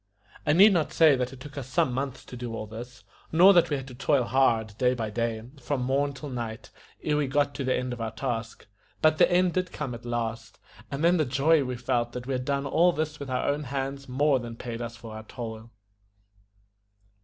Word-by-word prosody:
I 150 - +5
need 200 +5 +7
not 160 -4 +1
say 160 -3 +6
that 125 -1 -2
it 135 - -11
took 145 +2 -8
us 130 - -7
some 130 0 +1
months 135 0 -4
to - - -10
do 120 -2 -5
all 110 - -4
this, 115 +1 -10 0.3
nor 180 +5 +7
that 175 -2 +4
we 145 - 0
had 135 -1 -7
to - - -10
toil 140 +1 +2
hard 115 -4 +2
day 125 0 +3
by 110 -3 -3
day, 115 0 -2 0.2
from 130 0 -2
morn 140 +3 +1
till 140 +2 -8
night, 115 -3 -5 0.3
ere 150 -1 +1
we 145 -2 +1
got 145 +1 +1
to 135 - -4
the 130 0 +1
end 125 0 -2
of 120 - -7
our 115 - -1
task; 115 -1 -4 0.4
but 155 0 +4
the 180 - +5
end 180 0 +3
did 185 -1 -1
come 140 -5 -4
at 120 0 -8
last, 120 -1 -4 0.3
and 140 +3 -4
then 175 +2 +5
the 155 - +3
joy 140 +4 +3
we 125 -1 -3
felt 120 -1 -1
that 125 0 -6
we 135 - -2
had 125 0 -2
done 140 0 -1
all 170 +6 +4
this 155 -2 -3
with 140 - -6
our 125 0 -1
own 145 +1 0
hands 135 +1 -4
more 140 +1 +2
than 120 -1 -7
paid 115 0 -6
us 120 0 -5
for 115 -2 -10
our 110 - -6
toil. 110 -1 -7
130 Hz, 235 wpm, -27 LUFS, 120-145 Hz, 0.4 s, need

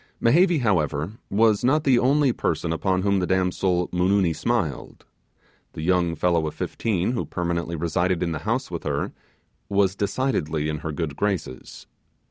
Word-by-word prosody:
Mehevi, 170 +5 +4
however, 85 - 0
was 110 +1 +3
not 150 +5 +3
the 130 -4 +4
only 135 0 +3
person 80 -3 -1
upon 95 +2 0
whom 100 -1 +2
the 90 - -1
damsel 90 -1 +1
Moonoony 90 -1 +2
smiled - - -2 0.7
the 80 - -6
young 85 -1 +1
fellow 85 -1 +1
of 75 - -6
fifteen, 105 -2 -1
who 125 - -1
permanently 85 -1 -3
resided 85 +2 0
in 85 - -1
the 80 - -3
home - - 0
with - - -4
her, - - -2 0.6
was 100 -2 +2
decidedly 95 - -1
in 75 -1 -3
her 80 +1 -4
good 75 -2 -3
graces. 95 -10 -4
90 Hz, 155 wpm, -24 LUFS, 85-105 Hz, 0.7 s, Mehevi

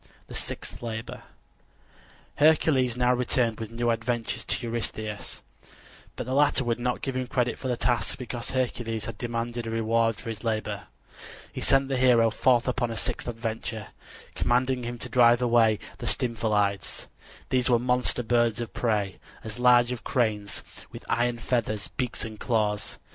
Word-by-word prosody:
THE - - -11
SIXTH - - -4
LABOR 115 -1 -5 1.2
Hercules 145 -5 +4
now 125 0 +3
returned 120 -2 +1
with 110 -2 -5
new 120 +1 0
adventures 115 0 -2
to - - -1
Eurystheus; 110 -2 -3 0.7
but - - -4
the 130 - -3
latter 145 -1 +4
would 120 -1 -1
not 125 0 -1
give 135 -2 -2
him 130 -1 -2
credit 125 -1 0
for 130 - -4
the 125 -2 0
task 120 0 +1
because 120 -2 -5
Hercules 120 -3 -2
had 115 - -7
demanded 120 0 -3
a - - -2
reward 115 0 +1
for 115 - -7
his 110 -1 -6
labor. 110 -3 -2 0.7
He - - -5
sent 135 0 +4
the 135 -1 -1
hero 120 -3 +5
forth 120 +1 +3
upon 125 -1 0
a 115 - -4
sixth - - -2
adventure, 115 -2 -4 0.4
commanding 125 +1 +1
him 120 0 -4
to - - -6
drive 120 -1 +5
away 115 -3 +4 0.2
the - - -4
Stymphalides. 105 -4 0 0.4
These 130 0 +2
were 120 - +5
monster 125 0 +1
birds 120 0 +2
of 120 -2 -5
prey, 105 -5 0 0.2
as 110 +2 -5
large 125 -1 +5
as 125 - -3
cranes, 105 -5 -1 0.3
with - - -10
iron 120 0 +1
feathers, 115 -3 -1
beaks 125 -1 -3
and 110 -1 -8
claws. 105 -4 0
120 Hz, 165 wpm, -27 LUFS, 115-125 Hz, 1.2 s, hero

